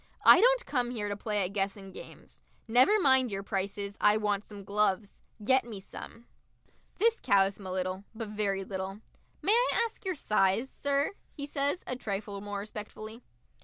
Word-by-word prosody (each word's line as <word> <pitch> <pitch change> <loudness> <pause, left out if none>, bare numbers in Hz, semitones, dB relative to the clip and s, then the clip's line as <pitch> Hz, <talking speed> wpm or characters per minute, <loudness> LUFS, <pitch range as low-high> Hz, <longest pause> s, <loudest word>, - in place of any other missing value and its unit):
"I - - +9
don't - - +4
come 250 -4 0
here 215 -4 -3
to 205 - -2
play 210 -1 0
at 190 - -5
Guessing 195 -1 -2
Games. - - -12 0.3
Never 255 - +5
mind 265 - +4
your 195 0 -3
prices. 200 0 -3
I 210 +1 +5
want 210 -1 -1
some 205 -2 -10
gloves. 200 0 0 0.2
Get 260 +4 +4
me 225 -4 -8
some!" 230 +4 -11 0.7
This 460 +3 +3
cows 195 0 +3
him 195 - -8
a - - -4
little, 185 +1 -2
but 225 -1 -5
very 200 -2 -1
little. 190 +1 -5 0.4
"May 400 - +3
I 480 0 +3
ask 455 - -9
your 375 -2 -2
size, 215 -1 +1
sir?" 280 +2 0 0.2
he 285 - -5
says, 285 +4 -1
a 255 - -3
trifle 200 -3 -4
more 205 0 -5
respectfully. 215 +2 -7
210 Hz, 175 wpm, -30 LUFS, 200-260 Hz, 0.7 s, I